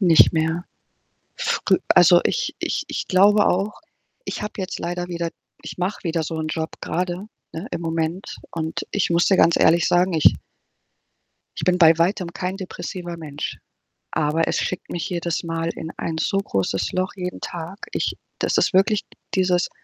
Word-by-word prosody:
Nicht 175 -4 +6
mehr. 160 +2 0 0.7
Früh - - +2
also, - - +7
ich - - 0
ich - - -2
ich - - -4
glaube 205 +3 +5
auch, 195 +8 0 0.4
ich - - -4
habe 210 +1 -4
jetzt 190 -1 -4
leider 175 0 -3
wieder 170 -1 -2 0.3
ich - - -8
mache 185 +3 -2
wieder 165 -1 0
so 160 +1 -4
'n 155 - -2
Job 160 0 -3
grade, 180 +3 -2 0.3
ne, 170 +8 -5
im 170 - -3
Moment. 165 +3 -2
Und 160 -1 -3
ich 200 - +1
muss 170 0 +3
dir 190 - +4
ganz 170 - +5
ehrlich 165 +1 +4
sagen, 180 +1 +3
ich 155 - +5 1.2
ich - - -3
bin 180 0 +3
bei 165 -1 +7
Weitem 175 0 +1
kein 185 +1 -3
depressiver 175 -2 -6
Mensch. 150 -3 -5 0.5
Aber 155 +2 +1
es - - 0
schickt 185 - -3
mich 170 - -3
jedes 170 -2 -2
Mal 165 0 -2
in 160 - -6
ein 165 -1 -3
so 195 +4 +1
großes 95 - -1
Loch, 185 +2 -1
jeden 180 -1 -5
Tag. 175 +3 -6
Ich - - -1 0.2
das - - +1
ist - - +2
wirklich 200 +2 +3 0.3
dieses 180 -2 +2
175 Hz, 170 wpm, -22 LUFS, 165-185 Hz, 1.2 s, also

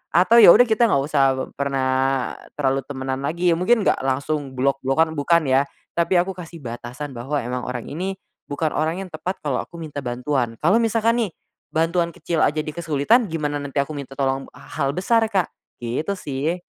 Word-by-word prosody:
atau 190 +7 +5
ya - - +9
udah 245 - +7
kita 230 +1 +3
gak 140 -9 +2
usah 135 - +4
pe 130 - -2 0.2
pernah, 135 -1 0 0.3
terlalu 135 -1 +1
temenan 130 -1 -3
lagi, 170 +4 +1
ya 165 - +3
mungkin 225 +3 +3
gak - - +2
langsung 135 +1 -2
blok-blokan 135 +4 +1
bukan 160 +2 +2
ya. 130 +1 +4 0.3
Tapi 170 +2 +1
aku 185 +2 0
kasih 170 -2 -9
batasan 120 +4 -6
bahwa 130 +5 -4
emang 125 +1 -3
orang 125 -2 -4
ini, 185 +5 -3 0.3
bukan 150 +2 -1
orang 160 +4 0
yang 185 - -10
tepat 180 +4 -4
kalau 140 -4 0
aku - - -16
minta 155 -3 -6
bantuan. 125 -1 -1
Kalau 195 +8 +4
misalkan 230 +1 +2
nih, 210 -7 -1 0.4
bantuan 170 +1 +1
kecil 170 -1 -2
aja 155 +2 +2
dia 155 -1 -7
kesulitan 170 - +2
gimana 150 -2 -2
nanti 140 0 -3
aku 145 - -9
minta 135 -1 -7
tolong 135 -1 -1
h - - -18 0.2
hal 140 -2 +2
besar 225 +5 +2
Kak. 190 -5 +2 0.4
Gitu 130 +11 -2
sih, 150 0 -2
150 Hz, 190 wpm, -22 LUFS, 135-175 Hz, 0.4 s, ya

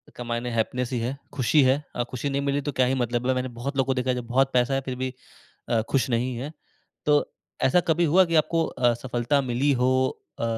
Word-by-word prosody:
का 120 - -6
मायने 120 +1 -3
हैप्पीनेस 120 +2 -1
ही 120 - 0
है, 120 +3 -2 0.2
ख़ुशी 145 +3 +3
है। 130 0 +4 0.2
अ, 120 - 0
खुशी 130 +3 -3
नहीं 140 0 -1
मिली 140 0 0
तो - - +1
क्या 130 - +4
ही 130 - +1
मतलब 120 +1 -2
ल 130 - +3
मैंने 130 0 -1
बहुत 140 +3 -4
लोगों 135 - +3
को 135 - +2
देखा 130 0 -2
है 125 - +2
जो 125 - -3
बहुत 135 +2 +2
पैसा 125 +2 +2
है 135 - +1
फिर 130 -1 -3
भी 130 -1 -2 0.6
अ, 115 -2 +2
ख़ुश 135 -1 +1
नहीं 120 +1 0
है। 140 +5 -5 0.5
तो 150 -1 +5 0.4
ऐसा 155 +7 +4
कभी 170 +2 +3
हुआ 190 +1 +7
कि 170 -1 -1
आपको 165 +1 +2
अ, 120 -2 +1
सफलता 120 +3 0
मिली 140 +4 +2
हो 130 - +4 0.5
अ, - - -2
130 Hz, 245 wpm, -25 LUFS, 120-140 Hz, 0.6 s, हुआ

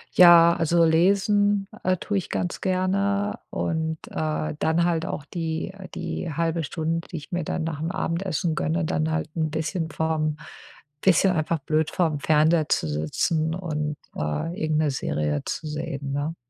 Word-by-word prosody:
Ja, 170 -1 +8
also 170 +1 +3
lesen, 200 +4 +3 0.2
äh, 185 0 +2
tue 205 +3 -2
ich 185 - -8
ganz 175 - -2
gerne 200 +2 0
und, 160 -1 -2
äh, 155 0 -2
dann 160 +2 +2
halt 170 0 0
auch 145 - -4
die 165 +3 -3 0.2
die 170 - -4
1/2 165 +2 -1
Stunde, 165 +2 -2
die 175 - -6
ich 150 - -10
mir 175 -1 -1
dann 160 - -2
nachm 160 0 -3
Abendessen 175 -2 -1
gönne, 80 - 0
dann 80 0 0
halt 80 0 -1
'n 160 -2 0
bisschen 160 +2 -2
vorm 155 -1 -1 0.6
bisschen 190 0 +4
einfach 160 +1 0
blöd 155 +2 0
vorm 160 -5 0
Fernseher 155 +1 +3
zu - - +1
sitzen 155 - 0
und, 150 -4 -3 0.2
äh, 75 - -2
irgend 155 -1 +1
'ne 155 -2 +2
Serie 75 - -1
zu - - -4
sehen, 145 -2 -4
ne? 145 +4 -2
160 Hz, 160 wpm, -25 LUFS, 150-175 Hz, 0.6 s, Ja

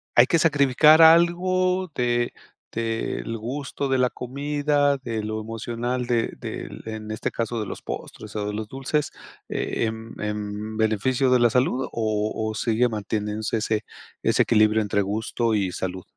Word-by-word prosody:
¿hay 120 - +8
que 165 +5 +2
sacrificar 150 +1 +6
algo 180 +2 +4
de 120 -1 0 0.4
del 115 0 -2
gusto 135 +4 -4
de 130 - +2
la 125 -1 +3
comida, 145 +2 0
de 115 -5 -4
lo 110 0 -3
emocional 120 +3 -3
de 120 -2 +1
del - - -6
en 110 -1 -6
este 110 - -2
caso 115 0 -3
de 105 - -2
los - - -7
postres 110 - -7
o 105 - -2
de 105 - -3
los 110 0 -4
dulces? 135 +4 -1 0.4
Eh, - - -2
em, 110 +1 -6
¿en 105 +1 -4
beneficio 120 +5 +1
de 125 - +5
la 120 - +5
salud 125 +2 +1
o 110 -1 -1 0.2
o 110 - -5
sigue 115 +2 +2
manteniéndose 105 0 -2
ese 110 0 -1 0.4
ese - - +4
equilibrio 110 0 +4
entre 100 0 0
gusto 110 +3 -1
y 95 -4 0
salud? 95 0 -4
115 Hz, 160 wpm, -24 LUFS, 110-135 Hz, 0.4 s, hay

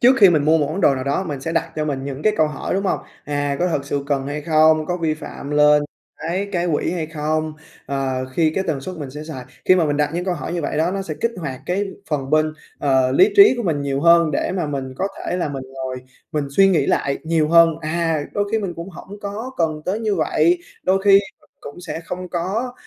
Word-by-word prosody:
trước 255 +2 +6
khi 195 -4 +8
mình 150 -4 +2
mua 160 +2 +4
một 145 - +1
món 165 +7 -3
đồ 140 - +4
nào 130 0 -4
đó 140 +7 0
mình 145 -5 -5
sẽ 165 +3 -4
đặt - - 0
cho 155 - 0
mình 135 -3 -3
những 140 +1 -5
cái 215 - +3
câu 155 - +4
hỏi, 150 +4 -4
đúng 195 +1 -1
hông? - - +1 0.3
À, 145 -1 -1
có 180 +1 +1
thật 140 -4 -1
sự 140 0 -2
cần 140 -2 -1
hay 145 +1 -3
không, 155 0 +4
có 180 - -1
vi 160 -3 0
phạm 150 -2 -8
lên 150 0 +5 0.4
cái 185 +5 -2
cái 175 -1 0
quỹ - - 0
hay 170 -3 -2
không? 155 0 -2 0.3
Ờ, 135 -2 -2
khi 160 +3 +2
cái 190 - 0
tần 150 -5 -1
suất 185 +5 -7
mình 145 -4 -6
sẽ 150 +3 -8
xài 135 -6 -7 0.2
khi 185 - +6
mà 175 -3 +3
mình 145 -1 0
đặt 150 0 +1
những 175 +1 -2
câu 180 -2 0
hỏi 170 - -5
như 170 -3 -2
vậy - - -2
đó, 160 +3 +2
nó 195 0 -2
sẽ 160 -5 -5
kích 230 - +1
hoạt 140 -6 -5
cái 195 +3 0 0.3
phần 135 -2 -2
bên, 155 0 +3 0.3
ờ, 130 -2 +2
lý 405 +2 +5
trí 400 -8 +9
của 240 - -2
mình 160 -7 0
nhiều 140 -1 -1
hơn 170 -1 +5
để 145 - -1
mà 175 -5 -1
mình 135 -2 -4
có 195 - -1
thể - - -3
là 175 - -1
mình 135 -2 -5
ngồi 130 -1 -4 0.4
mình 150 -2 0
suy 195 +7 +5
nghĩ 160 -7 +2
lại 140 - 0
nhiều 160 -2 +1
hơn. 170 0 +7
À, 165 0 0
đôi 205 - 0
khi 225 - +3
mình 190 -5 -4
cũng 170 +3 -6
hổng 200 +4 -11
có 210 +5 -5
cần 155 -2 -1
tới 205 +5 -1
như 215 -3 0
vậy, 160 +1 +2 0.2
đôi 190 +1 +2
khi 200 - +5 0.3
mình - - -28
cũng 145 +5 -10
sẽ 165 -2 -5
không 180 +2 -6
có, 195 +9 -2
160 Hz, 260 wpm, -21 LUFS, 145-180 Hz, 0.4 s, trí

